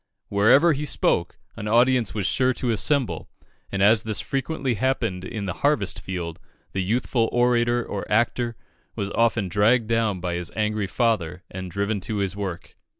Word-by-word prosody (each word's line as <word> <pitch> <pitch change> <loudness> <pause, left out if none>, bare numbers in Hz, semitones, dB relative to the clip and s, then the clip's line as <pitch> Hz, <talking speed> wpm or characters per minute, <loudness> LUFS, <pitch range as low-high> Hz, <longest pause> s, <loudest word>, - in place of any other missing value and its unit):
Wherever 130 +12 +5
he 145 +1 -3
spoke 150 - 0 0.2
an 105 - -5
audience 120 0 +3
was 100 -3 -1
sure 130 +5 +2
to 120 0 -1
assemble, 115 - 0 0.4
and 100 0 0
as 105 +1 +5
this 110 -2 -3
frequently 135 -1 -2
happened 115 -5 -1
in 100 +1 -5
the 90 - -2
harvest 140 -10 +1
field, 85 -3 -5 0.3
the 95 - -1
youthful 115 +3 0
orator 120 -1 +2
or 100 - -5
actor 120 +2 +1 0.4
was 100 0 -3
often 115 -3 +2
dragged 110 +6 +3
down 115 -4 +1
by 90 0 -3
his 85 0 -3
angry 105 -2 0
father 90 -5 0
and 95 0 -6
driven 100 +3 -1
to 105 +3 -4
his 100 -1 -1
work. 95 -4 -6
110 Hz, 165 wpm, -24 LUFS, 95-120 Hz, 0.4 s, Wherever